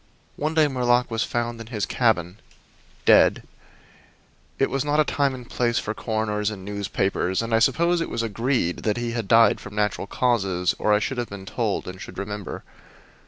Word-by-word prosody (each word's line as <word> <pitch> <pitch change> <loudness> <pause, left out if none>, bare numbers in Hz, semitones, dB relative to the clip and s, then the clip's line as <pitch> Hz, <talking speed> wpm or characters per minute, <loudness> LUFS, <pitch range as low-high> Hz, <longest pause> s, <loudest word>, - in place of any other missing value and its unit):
One 155 +2 -2
day 155 -2 +5
Murlock 125 -2 +1
was 115 -1 0
found 120 -1 -3
in 115 - -9
his 110 -4 -2
cabin, 100 -5 0 0.7
dead. - - +5 1.1
It 135 - +1
was 135 -1 0
not 150 +1 +1
a - - +6
time 140 -3 0
and 125 -2 -10
place 120 -1 0
for 105 - -2
coroners 110 -2 -1
and 95 -3 -8
newspapers, 100 -2 -1
and 115 0 -3
I 115 - +5
suppose 170 +8 +2
it - - -2
was 115 - -2
agreed 115 -4 0
that 105 +1 -1
he 120 -1 -2
had 115 -3 -3
died 115 0 +5
from 105 0 -10
natural 105 -1 -1
causes 100 -8 +1
or 105 - +1
I 105 - +6
should 125 +4 -2
have 120 - -3
been 100 -1 -8
told, 110 0 -2
and 90 +1 -8
should - - -9
remember. 105 0 -5
115 Hz, 190 wpm, -24 LUFS, 105-125 Hz, 1.1 s, a